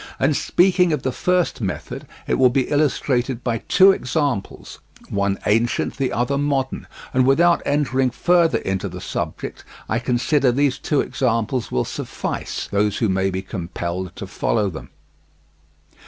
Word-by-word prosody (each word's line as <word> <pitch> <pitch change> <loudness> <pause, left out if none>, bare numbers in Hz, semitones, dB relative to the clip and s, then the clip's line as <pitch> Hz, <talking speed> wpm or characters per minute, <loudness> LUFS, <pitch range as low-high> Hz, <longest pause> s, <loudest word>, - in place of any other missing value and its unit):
And 140 +2 +2
speaking 180 +1 +3
of 150 - -2
the 130 - 0
first 180 -1 0
method, 95 -4 -5 0.2
it - - 0
will 130 -1 +6
be 130 +1 0
illustrated 135 -4 0
by 115 -2 -1
two 190 +1 +7
examples—one 110 - -3
ancient, 115 +3 +1
the 135 -2 0
other 135 +4 0
modern—and 135 -2 -1
without 170 +5 +4
entering 135 -3 +1
further 170 +1 +3
into 95 -1 -3
the 90 +1 -8
subject, - - -5 0.2
I 110 - 0
consider 130 +2 +2
these 135 +1 +1
two 150 - +1
examples 115 -1 -1
will 60 - 0
suffice - - -4
those 105 0 +1
who 110 - +1
may 95 +1 +1
be 95 0 -3
compelled 90 0 -5
to - - -6
follow 105 -4 0
them. 80 - -9
125 Hz, 140 wpm, -21 LUFS, 105-145 Hz, 0.2 s, two